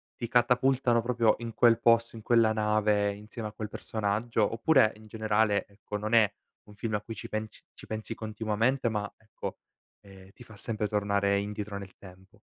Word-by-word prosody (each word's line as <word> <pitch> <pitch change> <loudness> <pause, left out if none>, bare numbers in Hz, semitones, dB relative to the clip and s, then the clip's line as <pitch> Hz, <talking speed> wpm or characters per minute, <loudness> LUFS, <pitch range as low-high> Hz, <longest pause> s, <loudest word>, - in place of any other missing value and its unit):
ti 120 - -5
catapultano 125 0 +3
proprio 115 -2 +2
in 115 -1 -6
quel 115 -1 +4
posto, 115 0 +3
in 110 - -8
quella 115 -1 +3
nave 105 -1 +2
insieme 105 +2 -7
a - - -12
quel 110 0 -6
personaggio? 110 +1 -1
Oppure, 115 -1 +4
in 110 0 -15
generale, 110 -1 +1
ecco, 105 +1 -7
non 110 +2 -4
è 110 -3 +5 0.3
un 105 - -14
film 110 +1 -4
a 105 - 0
cui 115 - -7
ci 110 - -7
pens 110 0 -5
ci - - -13
pensi 110 +1 -5
continuamente, 110 +4 -1
ma, 105 -2 -2
ecco, 110 0 -8 0.4
ehm, 95 -1 -15
ti 125 - -14
fa 110 - -14
sempre 105 0 -1
tornare 100 -1 +1
indietro 105 0 -4
nel 100 -1 -10
tempo? 95 0 -16
110 Hz, 180 wpm, -29 LUFS, 105-115 Hz, 0.4 s, è